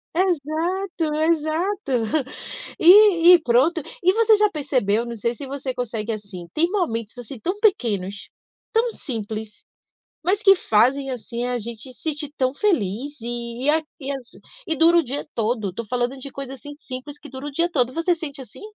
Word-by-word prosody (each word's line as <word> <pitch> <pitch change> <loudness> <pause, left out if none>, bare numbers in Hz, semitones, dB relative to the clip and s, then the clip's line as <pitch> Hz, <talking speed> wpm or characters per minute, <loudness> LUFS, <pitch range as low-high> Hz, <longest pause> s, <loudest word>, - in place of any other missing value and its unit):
Exato, 340 0 -1
exato, 320 +3 0 0.9
e 360 -1 +8
e - - +3
pronto. 275 +8 +3 0.2
E 370 +2 +5
você 445 0 +5
já 420 0 +4
percebeu? 250 - 0
Não 235 - -6
sei 235 +2 -1
se 280 - -7
você 265 -1 -4
consegue, 230 -3 -3
assim, 200 -5 -7
tem 335 +2 +2
momentos, 235 - -2
assim, 245 +1 -8
tão 370 - -3
pequenos, 205 - 0 0.4
tão 460 +1 +2
simples, 220 - -6 0.6
mas 390 +4 +1
que 390 -1 +8
fazem, 265 +1 +2
assim, 240 0 -4
a 250 0 -1
gente 235 +3 -6
sentir 295 0 -3
tão 255 0 +1
feliz, 285 - -1
e 240 +3 -3
a 315 +1 +3 0.2
e 275 0 -4
às 260 -3 -6 0.4
e 325 - +2
dura 330 +3 +5
o 335 - +4
dia 275 +3 -4
todo. 220 -2 -1
Estou 220 +5 -6
falando 245 +3 -1
de 270 +1 -8
coisas, 270 -1 -7
assim, 290 0 -10
simples, 280 0 -8
que 300 - -12
dura 265 +2 -7
o - - -5
dia 335 +5 0
todo. 255 -4 +1
Você 330 +2 +1
sente 305 -4 -7
assim? 260 - -13
275 Hz, 175 wpm, -23 LUFS, 235-335 Hz, 0.9 s, e